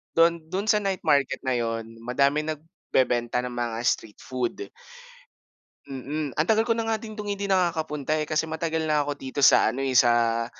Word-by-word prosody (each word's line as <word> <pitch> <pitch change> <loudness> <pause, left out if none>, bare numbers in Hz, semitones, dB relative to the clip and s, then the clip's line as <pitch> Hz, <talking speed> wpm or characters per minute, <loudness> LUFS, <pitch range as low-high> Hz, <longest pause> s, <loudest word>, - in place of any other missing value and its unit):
dun 165 0 +4
dun 190 +5 -3
sa 210 - +5
night 195 -3 -2
market 140 -1 +2
na 130 - +1
yun 115 -1 -3
madaming 140 +5 +1
nagbebenta 130 -7 -1
ng 125 - -4
mga 120 -2 -3
street 110 -3 -1
food. 130 - -4 1.2
Mm, 140 +2 -4
ang 155 - +2
tagal 220 0 +3
ko 230 - -1
na 225 - -2
nga 225 0 +1
din 215 -1 -8
dun 210 -1 -5
hindi 200 0 -4
nakakapunta, 160 -6 0
eh. 155 - 0
Kasi 155 +1 -1
matagal 160 0 -2
na 150 -1 +2
ako 145 0 -5
dito 130 +1 -6
sa - - +6
ano, 135 +2 -3
sa 115 -1 +4
150 Hz, 180 wpm, -25 LUFS, 125-170 Hz, 1.2 s, sa